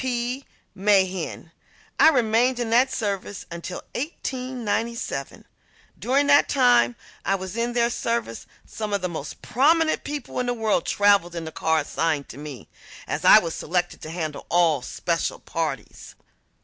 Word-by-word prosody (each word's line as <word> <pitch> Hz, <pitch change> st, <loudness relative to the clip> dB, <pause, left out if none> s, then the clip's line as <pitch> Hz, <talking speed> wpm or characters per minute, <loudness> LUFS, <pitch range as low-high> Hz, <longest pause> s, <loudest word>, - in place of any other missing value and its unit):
P. 250 Hz, +1 st, -2 dB, 0.3 s
Mehen. 190 Hz, -4 st, +1 dB, 0.5 s
I -, -, +8 dB
remained 245 Hz, -2 st, +2 dB
in 235 Hz, -2 st, -2 dB
their 245 Hz, +3 st, +5 dB
service 205 Hz, -5 st, -4 dB
until 170 Hz, +2 st, -6 dB
1897. 250 Hz, -5 st, -3 dB, 0.5 s
During 275 Hz, +3 st, +2 dB
the 285 Hz, 0 st, +6 dB
time 245 Hz, -, +4 dB, 0.3 s
I 195 Hz, -, +1 dB
was 190 Hz, +1 st, -6 dB
in 235 Hz, +1 st, -1 dB
their 235 Hz, 0 st, +2 dB
service 230 Hz, -, -3 dB, 0.2 s
some 215 Hz, -2 st, -5 dB
of 200 Hz, -, 0 dB
the -, -, +1 dB
most 155 Hz, -4 st, -7 dB
prominent 315 Hz, +5 st, +2 dB
people 290 Hz, -4 st, -5 dB
in 250 Hz, -, -1 dB
the 245 Hz, -, 0 dB
world 220 Hz, -6 st, 0 dB
traveled 200 Hz, -4 st, +3 dB
in 165 Hz, -1 st, -4 dB
the 160 Hz, -, -6 dB
car 160 Hz, 0 st, +1 dB
assigned 150 Hz, -1 st, -1 dB
to 135 Hz, -, -10 dB
me, 145 Hz, -4 st, -9 dB, 0.4 s
as -, -, -3 dB
I -, -, +9 dB
was 165 Hz, -1 st, 0 dB
selected 175 Hz, +2 st, -2 dB
to 155 Hz, -, -7 dB
handle 160 Hz, -3 st, -5 dB
all 170 Hz, -5 st, +3 dB
special -, -, -2 dB
parties. -, -, -5 dB
210 Hz, 150 wpm, -24 LUFS, 170-245 Hz, 0.5 s, I